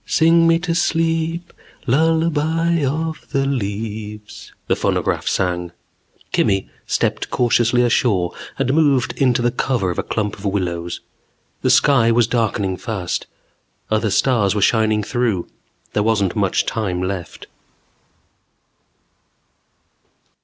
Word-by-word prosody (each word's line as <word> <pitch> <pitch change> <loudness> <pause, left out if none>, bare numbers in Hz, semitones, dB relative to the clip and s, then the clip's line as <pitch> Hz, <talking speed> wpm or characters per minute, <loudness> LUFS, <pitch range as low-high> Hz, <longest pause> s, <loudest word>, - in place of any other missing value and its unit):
"Sing 165 +1 +4
me 165 0 +4
to 170 0 -2
sleep, 165 0 0 0.3
lullaby 160 +3 +1
of 155 +4 -2
the 135 -1 0
leaves" 105 -3 -5
the - - +1
phonograph - - -1
sang. 90 -2 -1 0.6
Kimmy 95 -1 +1 0.2
stepped - - -1
cautiously 120 0 +2
ashore 105 -7 +1 0.2
and 130 - 0
moved 145 -5 +2
into 125 -2 +3
the 120 - +2
cover 120 -6 -1
of - - -4
a - - -1
clump 105 -2 -3
of - - -12
willows. 85 -4 -2 0.6
The - - +1
sky 125 -6 +4
was 115 0 +4
darkening 105 -5 -1
fast. 95 -2 -4 0.6
Other 110 0 +1
stars 105 -2 +2
were 105 - 0
shining 110 -1 +2
through. 110 -5 -1 0.5
There 105 - +1
wasn't 105 -4 +1
much 100 -3 +1
time 95 -5 -2
left. 95 -2 -5
115 Hz, 115 wpm, -20 LUFS, 100-145 Hz, 0.6 s, Sing